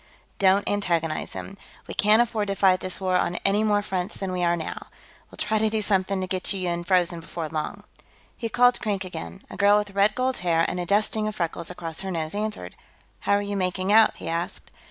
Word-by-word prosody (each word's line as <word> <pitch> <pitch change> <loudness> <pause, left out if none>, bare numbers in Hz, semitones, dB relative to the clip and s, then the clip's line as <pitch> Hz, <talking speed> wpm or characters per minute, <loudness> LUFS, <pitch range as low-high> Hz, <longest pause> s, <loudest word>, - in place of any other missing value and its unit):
Don't 195 +1 +4
antagonize 170 -6 -1
him; 195 - -7 0.3
we - - -7
can't 215 +3 +5
afford 220 -3 -2
to 200 - -1
fight 185 -1 +4
this 185 -1 -4
war 185 -1 +1
on 175 - 0
any 200 +2 +3
more 205 -1 +2
fronts 185 0 -3
than 195 -2 -3
we 180 -1 -1
are 170 0 +3
now. 160 -2 -6 0.4
We'll - - -15
try 215 0 +1
to 220 0 +2
do 220 0 -1
something 195 -2 +1
to - - -1
get 185 0 0
you 185 -2 -3
unfrozen, 175 0 +1
before 165 0 -5
long." 155 -1 -4 0.5
He 230 - -4
called 245 +2 +4
Krink 200 -3 -2
again. 85 - -8
A - - -7
girl 205 +1 +5
with 210 -1 -2
red 200 +2 +2
gold 255 0 0
hair 165 -2 +2
and 180 - -3
a 175 - -3
dusting 215 +2 +1
of 215 - -4
freckles 170 -2 -3
across 165 -2 -5
her 195 - -4
nose 160 -3 -3
answered. 215 +1 -4 0.5
"How - - +1
are 205 0 +2
you 205 0 -3
making 185 +1 0
out?" 220 0 +6
he - - -8
asked. 170 +1 -4
195 Hz, 220 wpm, -25 LUFS, 175-210 Hz, 0.5 s, out